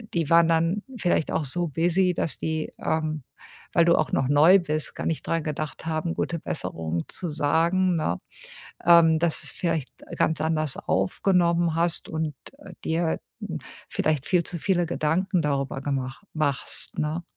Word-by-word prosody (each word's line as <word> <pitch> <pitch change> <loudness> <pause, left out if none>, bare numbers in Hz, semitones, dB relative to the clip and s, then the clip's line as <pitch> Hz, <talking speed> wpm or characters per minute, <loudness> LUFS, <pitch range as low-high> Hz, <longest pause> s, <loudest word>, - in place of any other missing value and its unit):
äh, 225 - -12
die 165 -2 0
waren 170 0 +6
dann 165 +5 +2 0.2
vielleicht 175 -4 +1
auch 155 - 0
so 175 +6 -1
busy, 175 +5 +2
dass 165 - -2
die, 160 -1 -2
ähm, 155 -3 -1 0.5
weil 170 -2 +5
du 170 - +5
auch 155 - 0
noch 135 - +1
neu 155 +7 +7
bist, 155 -3 -2
gar - - -4
nicht 165 - -2
dran 165 -1 0
gedacht 155 0 -4
haben, 160 +1 -1
„Gute 170 - -2
Besserung“ 80 - -3
zu 175 -3 -4
sagen, 170 +5 +2
ne, 90 - -1 0.7
ähm, 165 -2 +6
dass 170 -2 +1
du's - - -5
vielleicht 165 -8 -2 0.3
ganz 160 -2 +1
anders 155 -3 0
aufgenommen 170 - +1
hast 170 0 0
und, 160 -2 -2 0.3
äh, 190 -9 -11
dir 165 +2 +1
halt 160 - -1 0.2
n - - -4 0.3
vielleicht 155 -3 0
viel 180 -2 +3
zu 175 - -3
viele 175 -2 +1
Gedanken 175 +3 0
darüber 140 -2 -1
gemach 135 +3 -3
machst, 145 -4 -2
ne? 155 +3 -1
160 Hz, 170 wpm, -25 LUFS, 150-170 Hz, 0.7 s, neu